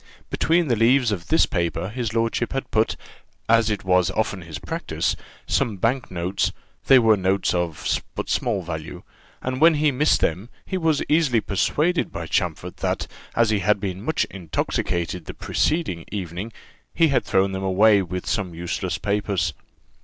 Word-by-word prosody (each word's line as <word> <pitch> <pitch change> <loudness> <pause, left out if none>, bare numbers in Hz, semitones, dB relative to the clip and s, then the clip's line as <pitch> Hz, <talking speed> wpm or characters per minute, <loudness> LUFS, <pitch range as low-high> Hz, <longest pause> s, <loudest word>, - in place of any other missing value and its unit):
Between 165 +1 +2
the 120 - +2
leaves 120 +2 +4
of 90 -4 -4
this 160 - +4
paper 85 +1 -2
his 115 0 -3
lordship 115 +1 0
had 135 - -4
put, 110 0 +2 0.5
as 115 0 +4
it 105 -2 -2
was 90 -1 +3
often 105 -3 -1
his 80 -3 -7
practice, - - -2 0.3
some 105 -4 0
bank 120 +6 0
notes: 90 +1 -1 0.4
they 135 - +8
were 110 -3 +5
notes 95 0 +1
but - - -1
of 85 -3 -2 0.2
small 105 -6 0
value, 80 -2 -6 0.4
and 130 +1 -3
when 165 0 +7
he 150 0 +3
missed 145 +4 +3
them 90 +8 -1 0.2
he 190 - -4
was 160 -5 +1
easily 150 -7 +3
persuaded 150 - 0
by - - -5
Champfort - - -2
that, - - -1 0.3
as 115 -1 +3
he 105 - +2
had 105 +1 +2
been 95 -2 -4
much 160 +9 0
intoxicated 85 -1 -2
the - - -8
preceding 150 - -1
night, 95 +2 -5 0.4
he 165 -2 +4
had 130 -3 +2
thrown 95 0 +2
them 95 0 -3
away 100 +2 +4
with 90 0 -5
some 90 -5 -2
useless 85 +1 -3
papers. 100 -4 -1
105 Hz, 170 wpm, -23 LUFS, 90-125 Hz, 0.5 s, they